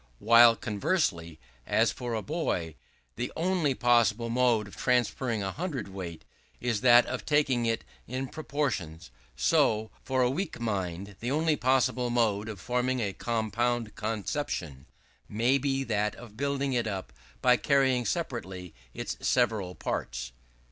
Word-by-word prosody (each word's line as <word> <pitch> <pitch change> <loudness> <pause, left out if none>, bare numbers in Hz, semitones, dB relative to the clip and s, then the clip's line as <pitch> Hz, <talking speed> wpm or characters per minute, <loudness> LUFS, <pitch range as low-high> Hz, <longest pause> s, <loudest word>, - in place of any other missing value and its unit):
While 115 - +7
conversely, 105 - -1 0.3
as - - +3
for 120 -2 -4
a 110 - -3
boy, 115 - -2 0.4
the 125 - -3
only 165 -5 +1
possible 115 -2 +3
mode 120 -3 +2
of 100 - -12
transferring 125 -2 0
a 95 - -2
hundred 155 - -4
weight, 90 -4 -7 0.3
is 115 -4 -1
that 120 -1 +7
of 125 - -4
taking 135 -6 +2
it 115 0 0 0.2
in 130 +2 -3
portions; 120 - -3 0.2
so, 110 0 +2
for 130 -1 +1
a 125 - +3
weak 185 +2 -3
mind, 100 -3 -3
the 120 - -3
only 155 +2 +2
possible 130 -1 +1
mode 110 -3 +1
of 105 -4 -7
forming 125 +4 0
a 100 -4 -1
compound 115 +1 -1
conception 105 - -3 0.4
may 120 +6 +2
be 135 0 0
that 105 -3 -1
of 115 -3 -12
building 140 +1 -1
it 120 -2 0
up 95 - -5 0.3
by 125 -1 +5
carrying 130 -1 +2
separately 95 - -4 0.2
its - - -4
several 110 -7 +1
parts. - - -4
120 Hz, 140 wpm, -29 LUFS, 105-130 Hz, 0.4 s, While